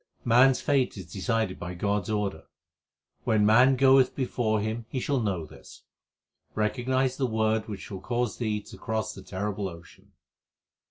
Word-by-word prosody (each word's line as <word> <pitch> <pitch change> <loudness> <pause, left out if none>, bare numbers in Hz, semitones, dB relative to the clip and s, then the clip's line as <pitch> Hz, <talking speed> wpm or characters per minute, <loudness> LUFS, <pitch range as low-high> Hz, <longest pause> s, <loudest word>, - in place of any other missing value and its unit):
Man 125 +3 +6
s 130 - -1
fate 135 -6 +1
is 90 -3 -9
decided 110 -1 -1
by 90 0 -6
God 100 +1 -1
s - - -7
order; 100 -6 -2 0.8
when 110 -2 +2
man 125 +5 +6
goeth 130 0 +5
before 120 -5 0
Him 110 +2 -3
he 130 - -2
shall 140 +1 0
know 95 -8 -2
this. - - -15 0.7
Recognize 130 +4 0
the 130 - 0
Word 110 -1 0
which 105 -1 -7
will 95 -2 -6
cause 120 -1 -2
thee 105 -3 -1
to - - -13
cross 110 -2 -2
the - - -10
terrible 100 0 -3
ocean. 85 -2 -15
110 Hz, 165 wpm, -27 LUFS, 100-125 Hz, 0.8 s, Man